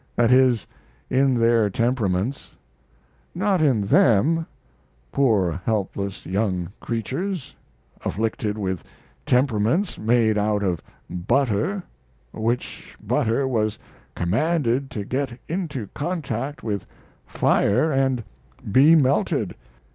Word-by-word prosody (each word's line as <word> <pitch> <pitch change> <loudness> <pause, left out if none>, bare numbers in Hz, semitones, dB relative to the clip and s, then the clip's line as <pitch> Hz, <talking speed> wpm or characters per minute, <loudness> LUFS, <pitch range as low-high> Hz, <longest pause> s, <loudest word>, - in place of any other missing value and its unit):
That 120 0 +3
is, 125 -4 +4 0.5
in 135 0 +3
their 115 -2 +3
temperaments. 115 +1 -1 0.8
Not 190 -1 +1
in 135 -8 +3
them, 135 +11 +3 0.6
poor 100 -10 +2
helpless 100 -2 -2
young 95 -3 -1
creatures 140 - -4 0.5
afflicted 110 0 -2
with 95 -4 -3 0.4
temperaments 125 - +1
made 110 -1 +2
out 105 0 +1
of 90 -5 -1 0.3
butter, 130 - 0 0.5
which 115 +3 -3
butter 115 +5 0
was 110 -4 0 0.4
commanded 135 - 0
to 105 -2 -5
get 130 0 -3
into 155 - -3
contact 145 -4 -3
with 105 -4 -3 0.4
fire 155 +10 +2
and 130 -3 +1 0.5
be 140 +9 +7
melted. 140 -3 +2
120 Hz, 95 wpm, -23 LUFS, 105-140 Hz, 0.8 s, be